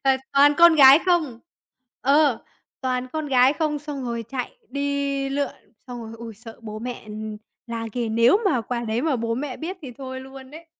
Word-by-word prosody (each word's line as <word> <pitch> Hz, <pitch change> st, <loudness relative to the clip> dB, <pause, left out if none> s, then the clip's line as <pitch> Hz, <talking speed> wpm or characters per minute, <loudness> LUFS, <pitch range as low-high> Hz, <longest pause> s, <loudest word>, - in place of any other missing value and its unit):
và 270 Hz, -1 st, +4 dB, 0.2 s
toàn 285 Hz, +1 st, +6 dB
con 340 Hz, -1 st, +8 dB
gái 275 Hz, -1 st, +9 dB
không 315 Hz, -10 st, +1 dB, 0.6 s
ờ, 280 Hz, -2 st, +3 dB, 0.4 s
toàn 255 Hz, -1 st, -1 dB
con 310 Hz, -1 st, -3 dB
gái 260 Hz, -1 st, +4 dB
không, 305 Hz, -1 st, -1 dB
xong 290 Hz, -2 st, -6 dB
rồi 235 Hz, -1 st, -3 dB
chạy 265 Hz, -, -5 dB
đi 280 Hz, -1 st, -2 dB
lượn, 280 Hz, 0 st, -1 dB, 0.4 s
xong 245 Hz, -1 st, -7 dB
rồi 225 Hz, 0 st, -9 dB
ôi, 230 Hz, -1 st, -8 dB
sợ 225 Hz, +2 st, -12 dB
bố 215 Hz, -1 st, -7 dB
mẹ, 245 Hz, +2 st, -6 dB
ừm, 215 Hz, 0 st, -6 dB, 0.3 s
la 230 Hz, -1 st, -4 dB
ghê, 240 Hz, 0 st, -2 dB
nếu 230 Hz, -, +4 dB
mà 300 Hz, -12 st, +2 dB
quả 235 Hz, +2 st, -4 dB
đấy 225 Hz, +2 st, -1 dB
mà 305 Hz, -4 st, +1 dB
bố 230 Hz, 0 st, -2 dB
mẹ 265 Hz, 0 st, -4 dB
biết 355 Hz, +4 st, -5 dB
thì 265 Hz, -4 st, -8 dB
thôi 260 Hz, -1 st, -6 dB
luôn 265 Hz, 0 st, -12 dB
đấy. 320 Hz, +3 st, -12 dB
265 Hz, 200 wpm, -23 LUFS, 235-285 Hz, 0.6 s, gái